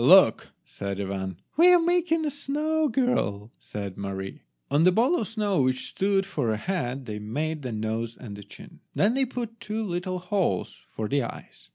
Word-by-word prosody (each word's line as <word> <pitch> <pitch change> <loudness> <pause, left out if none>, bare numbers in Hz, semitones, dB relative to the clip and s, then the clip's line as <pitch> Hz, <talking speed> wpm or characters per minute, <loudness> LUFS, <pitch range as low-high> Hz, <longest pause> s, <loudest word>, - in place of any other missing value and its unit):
"Look," - - +7
said 100 -1 -5
Ivan. 95 -2 -3 0.2
"We 350 +3 +8
are 355 - +7
making 335 -1 +2
a 295 - 0
snow 305 +3 0
girl," 115 - 0
said 100 -2 -6
Mary. 95 -1 -5 0.3
On 145 +3 +4
the 185 - +7
ball 250 - +3
of 215 - -2
snow 210 -7 +1
which 130 0 +1
stood 195 0 +1
for 145 -11 -1
a 110 - +1
head 135 - -2
they 105 -2 -4
made 150 +9 -2
the 125 -3 -4
nose 110 +1 -2
and 105 -5 -8
the 105 - -9
chin. 100 0 -13 0.2
Then 210 +4 +4
they 265 +1 +2
put 235 -2 -5
two 210 +2 -3
little 185 -1 -2
holes 180 - 0
for 110 - -3
the 140 +5 +2
eyes. 120 - -8
165 Hz, 190 wpm, -27 LUFS, -, 0.3 s, We